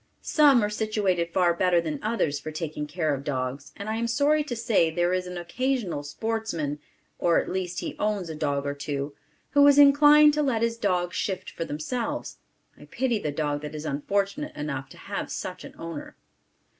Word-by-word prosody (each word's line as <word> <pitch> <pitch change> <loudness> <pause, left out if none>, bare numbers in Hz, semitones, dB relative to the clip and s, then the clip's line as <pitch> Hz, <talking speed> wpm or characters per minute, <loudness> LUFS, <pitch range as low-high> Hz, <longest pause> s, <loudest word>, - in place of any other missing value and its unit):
Some 280 -7 +5
are 210 - +1
situated 205 -6 0
far 175 -1 +3
better 175 0 +3
than 155 -4 -3
others 190 -10 0
for 150 - -6
taking 155 -1 -4
care 155 -1 -1
of 135 0 -4
dogs 135 -1 -3
and 200 - -6
I 220 +1 -1
am 235 +1 -1
sorry 290 +5 +2
to 245 - -4
say 225 -8 +2
there 175 +2 +1
is 185 0 -1
an 180 0 -6
occasional 210 - -2
sportsman 165 -3 -3 0.4
(or 170 -1 +3
at - - -1
least 180 -1 -3
he - - -5
owns 210 -4 0
a 160 - -5
dog 145 -2 -1
or 140 - -1
two), 140 0 -4 0.4
who 285 0 +6
is 285 -1 +6
inclined 295 +1 +7
to 300 - +1
let 245 -6 +1
his 230 0 0
dogs 180 -3 0
shift 190 -3 -3
for 165 - -4
themselves. 190 - -4 0.4
I - - -12
pity 245 -4 -1
the 150 - -2
dog 145 -1 -2
that 150 0 -7
is 155 +1 -6
unfortunate 200 - -1
enough 140 -2 -4
to - - -14
have 200 0 -5
such 185 0 -5
an - - -11
owner. 165 -3 -7
180 Hz, 195 wpm, -26 LUFS, 150-230 Hz, 0.4 s, inclined